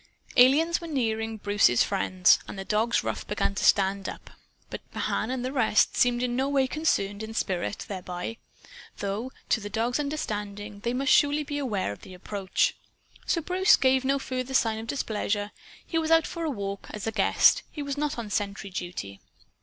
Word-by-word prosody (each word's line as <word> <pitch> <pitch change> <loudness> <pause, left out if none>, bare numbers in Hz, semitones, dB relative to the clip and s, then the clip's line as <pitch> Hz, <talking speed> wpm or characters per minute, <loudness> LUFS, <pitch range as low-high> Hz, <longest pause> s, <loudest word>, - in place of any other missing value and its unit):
Aliens 300 +7 +5
were 335 - -6
nearing 225 -6 -1
Bruce's 205 - +3
friends. 185 -2 +3
And - - -8
the 195 - -5
dog's 220 +3 +1
ruff - - -4
began - - -1
to 200 - -3
stand 195 -1 +3
up. - - -10 0.4
But - - -5
Mahan 220 - -1
and 255 -1 -2
the 255 - -2
rest 225 -6 +2
seemed 245 0 +2
in 245 -1 -1
no 265 +2 0
way 275 -2 +3
concerned 215 -9 -1
in 220 0 -6
spirit 190 0 -2
thereby 180 +2 -5 0.6
though, 205 +6 -3 0.2
to - - +3
the 205 -1 -6
dog's 235 +5 -1
understanding, 210 -8 -4
they 235 +4 -2
must 270 +1 +1
surely 295 0 +4
be 290 0 -4
aware 210 - -1
of 100 - -9
the 185 - -11
approach. 195 +1 -1 0.5
So 335 - +1
Bruce 370 +5 +4
gave 260 -1 +3
no 275 +1 +2
further 260 -1 -4
sign 225 -3 +2
of 225 - -7
displeasure. 210 -5 -2 0.3
He 325 - -1
was 320 -1 -2
out 325 -1 +5
for 335 -1 -4
a - - 0
walk, 200 -6 -5
as 210 - -6
a 225 - -1
guest. 220 - +4
He 295 - -6
was 280 -1 -3
not 295 -2 -2
on 225 -3 -5
sentry 200 0 -3
duty. 175 - -6
225 Hz, 190 wpm, -27 LUFS, 200-275 Hz, 0.6 s, Aliens